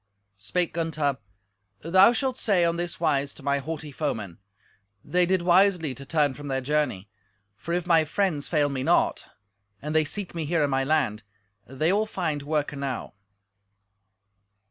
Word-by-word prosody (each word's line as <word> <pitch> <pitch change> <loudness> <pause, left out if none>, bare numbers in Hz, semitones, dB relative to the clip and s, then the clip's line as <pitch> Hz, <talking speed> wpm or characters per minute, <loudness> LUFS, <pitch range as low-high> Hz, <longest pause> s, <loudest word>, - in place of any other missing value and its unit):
Spake 170 - -1
Gunther, 155 -4 -1 0.6
"Thou 185 +7 +6
shalt 255 +2 -1
say 195 -8 +2
on 170 0 0
this 175 -1 -4
wise 145 -4 0
to 150 - -12
my 140 0 +1
haughty 150 +1 -6
foemen: 110 - -4 0.7
They 180 0 +2
did 185 -1 +1
wisely 180 -4 +3
to 135 +2 -11
turn 150 -2 +2
from 145 +2 -9
their 135 -1 -1
journey, 130 -8 -1 0.5
for 170 - -7
if 180 -1 -2
my 165 -3 +4
friends 155 -2 -1
fail 150 -3 +2
me 135 -2 -3
not, 130 - +1 0.5
and 150 +1 -5
they 155 - +5
seek 195 +5 -5
me 165 -2 -3
here 165 0 +1
in 145 - 0
my 135 0 +1
land, 135 -7 0 0.5
they 155 +7 0
will 215 +2 +1
find 160 -8 -2
work 150 0 -1
enow." 140 -3 -4
155 Hz, 165 wpm, -26 LUFS, 140-175 Hz, 0.7 s, Thou